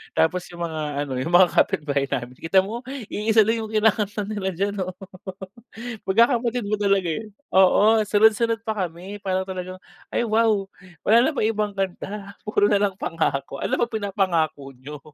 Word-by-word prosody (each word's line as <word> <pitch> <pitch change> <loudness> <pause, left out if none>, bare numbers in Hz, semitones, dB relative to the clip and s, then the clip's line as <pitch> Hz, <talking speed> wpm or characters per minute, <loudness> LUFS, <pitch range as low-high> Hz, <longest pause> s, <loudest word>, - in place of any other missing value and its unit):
tapos 175 +2 +2
'yung 170 0 -4
mga 160 -1 -5 0.3
ano, 135 - -4
'yung 160 +7 -3
mga 180 -1 +7
kapitbahay 140 -2 +1
namin 125 -1 -3
kita 165 +4 +3
mo 230 +5 -6 0.3
iisa 220 +1 +3
lang 225 0 0
'yung 220 - -7
kinakanta 210 -1 +1
nila 205 -3 -2
diyan 200 +3 -1
oh, 185 - -5 1.2
magkakapatid 235 +3 +2
nga 215 - 0
talaga, 195 -3 +2
eh. - - -11 0.3
Oo, 210 +4 +5
sunod 215 +2 +5
sunod 230 -1 0
pa 220 - +1
kami 180 +5 -9
para 190 -1 0
talagang, 185 0 -6 0.4
"Ay - - +1
wow 215 -3 +2 0.4
wala 225 +2 +6
na 315 - +2
bang 215 - +1
ibang 210 -1 -2
kanta, 195 +1 -4
puro 205 -1 +3
nalang 200 -1 +2
Pangako 140 -4 -2
ano - - 0
ba 240 - +2
pinapangako 185 - -1
niyo?" 145 +3 -9
200 Hz, 165 wpm, -23 LUFS, 175-215 Hz, 1.2 s, mga